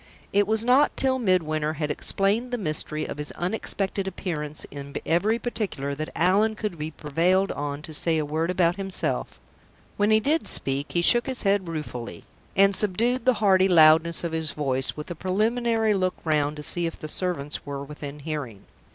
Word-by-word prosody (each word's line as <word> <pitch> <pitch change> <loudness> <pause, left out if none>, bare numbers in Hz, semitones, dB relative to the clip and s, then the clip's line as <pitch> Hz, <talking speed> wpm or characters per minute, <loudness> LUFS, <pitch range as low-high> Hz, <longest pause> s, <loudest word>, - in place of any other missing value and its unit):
It 200 0 +3
was 220 +1 +1
not 260 +4 +3
till 260 -1 +2
Midwinter 155 -7 0
had 150 -1 -2
explained 205 +10 0
the 245 - -2
mystery 155 -5 0
of - - -7
his 150 - -4
unexpected 195 +1 -3
appearance 155 -6 -4
in 140 0 -9
every 205 +7 +1
particular 210 - -4
that 155 +2 -5
Allan 200 +6 +2
could 210 -6 -5
be 155 +1 -3
prevailed 170 +6 0
on 145 0 -5
to 160 - -9
say 160 +2 +3
a 155 - -1
word 160 +3 -2
about 175 -1 +1
himself. 195 -1 -2 0.6
When 205 +1 +2
he 215 0 +5
did 300 +8 0
speak, 140 +2 +1
he 175 - +1
shook 240 +6 +5
his 260 -1 -1
head 195 -2 +1
ruefully, 150 -7 -6 0.3
and 195 0 +4
subdued 225 +6 0
the 255 -1 +4
hearty 190 -3 +3
loudness 165 -1 +5
of 170 - -2
his 160 -2 -1
voice, 135 -2 0
with 150 +3 -7
a - - -1
preliminary 220 +5 0
look 185 -2 0
round 150 -2 +1
to 150 - -7
see 170 +2 0
if 165 - -7
the 155 - -7
servants 155 -3 -2
were 140 -1 -6
within 145 0 -9
hearing. 140 -9 -6
175 Hz, 185 wpm, -25 LUFS, 150-205 Hz, 0.6 s, he